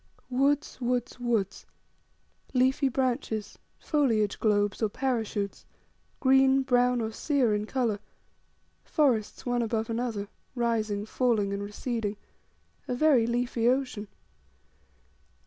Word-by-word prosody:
Woods, 275 +2 +1
woods, 245 0 -1
woods, 225 -6 -1 0.9
leafy 260 +2 +3
branches, 245 -4 -2 0.2
foliage 225 -9 +1
globes, 205 -2 +1
or 220 - +2
parachutes, 220 -5 -2 0.6
green, 265 0 +5
brown, 250 -1 +3
or 220 0 -2
sere 260 -3 +1
in 210 0 -1
colour, 235 -6 0 0.8
forests 255 -9 +1
one 245 -1 +1
above 225 0 -1
another, 225 -3 -2 0.3
rising, 220 -4 0
falling, 220 -4 +1
and 200 - -3
receding 210 0 -3 0.7
a 250 - -1
very 260 -4 +4
leafy 240 -1 0
ocean. 250 -5 0
240 Hz, 105 wpm, -28 LUFS, 215-255 Hz, 0.9 s, green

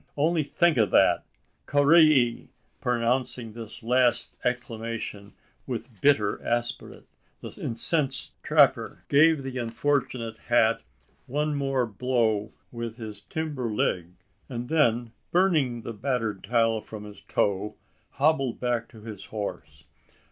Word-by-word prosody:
Only 160 +3 +2
think 165 +1 +2
of 110 -4 +3
that! - - +4 0.4
Carrai 145 +3 +6
i 120 -6 +3
i!" - - -21 0.3
Pronouncing 120 -1 -1
this 115 -2 -9
last 125 0 +2
exclamation 115 -4 -4 0.3
with 120 -4 -6
bitter 110 -8 +3
aspirate, 120 0 -3 0.4
the - - -7
incensed 135 +4 -1
trapper - - +3
gave 155 0 +5
the 130 -1 -4
unfortunate 120 -1 -1
hat 115 -2 +2 0.5
one 150 +3 0
more 135 -3 0
blow 110 -2 0 0.2
with 115 -1 -5
his 105 -3 -7
timber 145 0 -3
leg; 90 -4 -1 0.4
and 120 -1 -5
then, 120 -7 +2 0.2
spurning 155 -11 +2
the 115 - -5
battered 115 -3 -2
tile 115 0 +2
from 105 -1 -9
his 105 -1 -11
toe, 100 +1 -1 0.4
hobbled 135 -4 +1
back 120 -2 -1
to 110 -3 -14
his 105 -3 -8
horse! 85 -10 -6
120 Hz, 125 wpm, -26 LUFS, 110-135 Hz, 0.5 s, Carrai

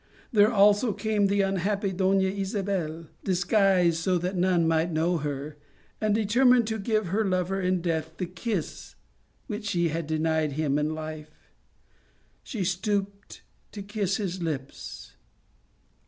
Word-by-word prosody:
There 210 0 +5
also 205 +1 +4
came 215 -2 +1
the 200 +1 +2
unhappy 195 +1 0
Dona 190 +1 +2
Isabel, 190 -4 -2 0.2
disguised 185 -2 +3
so 180 +2 +1
that 180 +3 -2
none 180 -2 +2
might 165 +1 +1
know 165 +2 +1
her, 145 0 -5 0.4
and, 215 -1 +2
determined 240 +3 +4
to 220 0 -2
give 215 -2 0
her 210 +5 +1
lover 190 0 0
in 185 -1 0
death 160 -2 -2
the 185 - -2
kiss 180 0 -5 0.5
which 210 -3 -5
she 175 -4 +1
had 160 0 -3
denied 160 -1 0
him 145 -1 0
in 155 +1 -1
life, 155 -1 -7 1.1
she 220 -8 -4
stooped 200 +2 -3 0.3
to 205 - -6
kiss 200 -2 -1
his 190 -3 -3
lips. 145 -5 -6
185 Hz, 140 wpm, -27 LUFS, 165-205 Hz, 1.1 s, There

